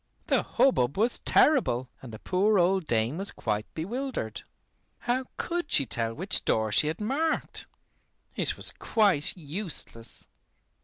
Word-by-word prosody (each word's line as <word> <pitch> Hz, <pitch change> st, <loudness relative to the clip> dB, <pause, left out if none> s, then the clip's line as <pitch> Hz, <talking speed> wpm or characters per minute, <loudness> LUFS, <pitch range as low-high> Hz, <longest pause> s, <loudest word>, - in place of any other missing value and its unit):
The -, -, +2 dB
hubbub 140 Hz, -, +1 dB
was 230 Hz, +4 st, +2 dB
terrible, 180 Hz, -, +3 dB
and 130 Hz, -, -10 dB
the 110 Hz, -, -8 dB
poor 200 Hz, -, +1 dB
old 185 Hz, -1 st, +2 dB
dame 115 Hz, +7 st, 0 dB
was 195 Hz, -, +1 dB
quite 105 Hz, -1 st, -3 dB
bewildered. 220 Hz, -, -4 dB, 0.6 s
How 255 Hz, +2 st, -1 dB
could 345 Hz, -3 st, -3 dB
she 140 Hz, -, +4 dB
tell 115 Hz, -1 st, -1 dB
which 185 Hz, +3 st, +1 dB
door 110 Hz, -1 st, 0 dB
she 150 Hz, -, +4 dB
had 160 Hz, +2 st, -3 dB
marked? 280 Hz, +9 st, -1 dB, 0.7 s
It -, -, +1 dB
was -, -, +3 dB
quite 195 Hz, -8 st, +1 dB
useless. 155 Hz, -, -5 dB
175 Hz, 140 wpm, -27 LUFS, -, 0.7 s, she